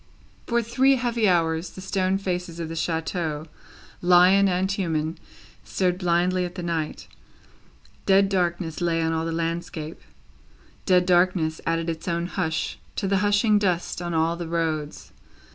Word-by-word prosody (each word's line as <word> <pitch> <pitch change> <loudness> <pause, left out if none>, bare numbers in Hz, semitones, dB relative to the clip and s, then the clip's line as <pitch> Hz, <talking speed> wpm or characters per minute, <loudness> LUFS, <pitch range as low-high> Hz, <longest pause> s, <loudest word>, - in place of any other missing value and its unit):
For 235 0 +1
three 260 +4 +3
heavy 235 -4 +1
hours, 165 -1 +1
the - - -12
stone 190 0 0
faces 180 -3 -4
of 165 -1 -4
the 165 - -5
chateau, 160 -1 -2 0.6
lion 180 +3 +6
and 185 +2 0
human, 160 -5 -2 0.4
stared 180 -1 -1
blindly 180 0 +1
at 180 0 -5
the 180 - -5
night. 165 -3 -3 1.0
Dead 195 0 +5
darkness 175 -3 -1
lay 170 -1 +1
on 165 0 0
all 160 0 -1
the 165 - -2
landscape, 165 -1 -4 0.9
dead 180 -2 +4
darkness 175 -3 +2
added 165 0 0
its 165 +1 -4
own 170 0 -1
hush 175 -3 -2 0.2
to 195 - -2
the 195 0 +2
hushing 205 +2 +3
dust 180 -3 -1
on 175 -1 -3
all 165 +1 +2
the 170 -1 -6
roads. 160 -3 -3
175 Hz, 150 wpm, -24 LUFS, 165-190 Hz, 1.0 s, lion